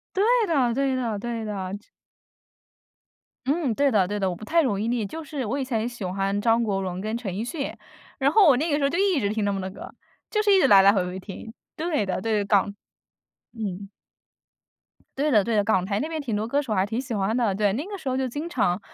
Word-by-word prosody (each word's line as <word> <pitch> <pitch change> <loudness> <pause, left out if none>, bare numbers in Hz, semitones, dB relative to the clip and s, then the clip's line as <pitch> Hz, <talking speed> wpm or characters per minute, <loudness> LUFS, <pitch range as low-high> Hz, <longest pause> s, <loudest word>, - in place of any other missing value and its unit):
对 390 - +3 0.2
的 270 -8 +2
对 270 0 +1
的 230 -5 -2
对 230 0 -4
的。 195 -3 -4 1.7
嗯， 285 -4 +1
对 280 +3 +2
的 195 -5 +2
对 205 +1 -2
的， 190 -1 0
我 175 - -3
不 195 - -14
太 330 +9 +2
容 205 -8 0
易 220 - -1
腻， 235 -3 0
就 320 +11 -6
是 290 -3 -5
我 240 +6 -2
以 270 - -1
前 230 -3 -1
喜 240 -2 -7
欢 195 +2 -1
张 230 +1 +3
国 200 -3 -1
荣 185 -1 -4
跟 215 +3 -3
陈 235 -5 -4
奕 215 - -3
迅。 275 +3 -4 0.4
然 280 +2 +2
后 395 -5 +6
我 265 - +6
那 315 +4 -1
个 290 - +2
时 - - -3
候 275 - +3
就 335 +6 -2
一 385 -7 +2
直 200 - 0
听 215 0 -1
他 200 - +1
们 195 - -2
的 190 0 -4
歌。 - - -10 0.4
就 425 -1 +1
是 415 - +4
一 385 - +6
直 - - +5
来 200 -6 +8
来 200 - +7
回 190 -3 +1
回 180 +1 -5
听。 205 +3 -9 0.2
对 310 - -1
的 185 - -2
对， 215 -2 +1
港 200 0 +2 0.8
嗯。 200 -3 -5 1.3
对 300 +2 +2
的 215 -7 +4
对 230 +1 -1
的， 205 - +4
港 190 -3 +2
台 200 +1 -1
那 305 - -2
边 320 -1 -3
挺 240 -7 -3
多 215 +2 -1
歌 280 +4 +1
手 250 -7 -3
还 190 -1 +2
挺 225 +4 -2
喜 255 -3 -5
欢 205 +2 0
的， 230 -6 +1
对， 205 0 +2
那 280 +8 -2
个 400 +1 -6
时 280 - -6
候 260 - 0
就 265 0 0
经 295 +7 -5
常 180 - 0
225 Hz, 270 characters per minute, -25 LUFS, 200-280 Hz, 1.7 s, 来